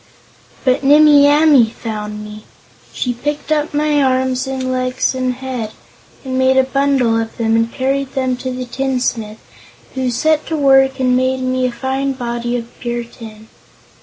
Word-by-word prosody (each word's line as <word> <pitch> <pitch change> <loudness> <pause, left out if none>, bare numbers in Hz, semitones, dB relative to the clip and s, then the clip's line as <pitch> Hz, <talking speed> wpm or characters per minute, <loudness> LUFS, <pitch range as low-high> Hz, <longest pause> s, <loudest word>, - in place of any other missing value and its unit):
"But 255 +1 +2
Nimmie 290 0 +6
Amee 290 -5 +5
found 210 -2 -6
me. 210 0 -11 0.5
She 250 - -2
picked 295 +5 -4
up 300 -1 0
my 295 0 +1
arms 260 0 0
and 260 -1 -3
legs 255 0 -1
and 255 -1 -2
head, 250 -4 -5 0.5
and 260 0 -2
made 260 0 +3
a 265 - +5
bundle 265 -4 +1
of 225 - -7
them 225 -1 +1
and 230 0 +1
carried 270 +1 -2
them 260 -1 0
to 255 - -5
the 255 0 -5
tinsmith, 245 -4 -2 0.6
who 260 -1 -1
set 305 +6 0
to 320 - -2
work 270 -1 +4
and 255 -1 +2
made 260 +1 0
me 255 0 0
a - - -3
fine 265 +3 -2
body 240 -1 -3
of 235 0 -10
pure 240 0 -3
tin. 220 -2 -13
255 Hz, 165 wpm, -17 LUFS, 240-270 Hz, 0.6 s, Nimmie